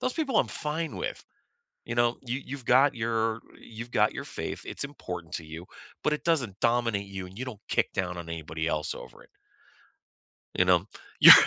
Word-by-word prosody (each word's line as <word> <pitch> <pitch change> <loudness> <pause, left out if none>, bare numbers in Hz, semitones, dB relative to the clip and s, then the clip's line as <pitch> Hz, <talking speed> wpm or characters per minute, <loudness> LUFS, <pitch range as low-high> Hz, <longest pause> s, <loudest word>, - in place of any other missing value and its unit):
Those 255 - 0
people 275 -7 +1
I'm - - -2
fine 155 +1 -3
with. - - -4 0.6
You 120 - -3
know, 120 0 +3
you 130 +1 -2
you've 135 -2 -6
got 135 +4 +6
your 115 -1 0 0.2
you've 115 +1 -8
got 105 -2 +4
your - - -4
faith, - - -5
it's - - -5
important 90 - -6
to 85 - -3
you, 80 +3 -8 0.4
but 150 - +3
it 150 - -1
doesn't 125 - +1
dominate 115 -4 +2
you 95 -1 -5
and 90 +1 -13
you 130 - -2
don't 120 -6 -7
kick - - +2
down 90 -2 -1
on 85 -1 -6
anybody 80 0 -3
else 75 -2 -1
over - - -11
it. - - -24 1.2
You 95 - +4
know? 90 0 +5 0.3
You're - - +13
115 Hz, 195 wpm, -29 LUFS, 90-130 Hz, 1.2 s, You're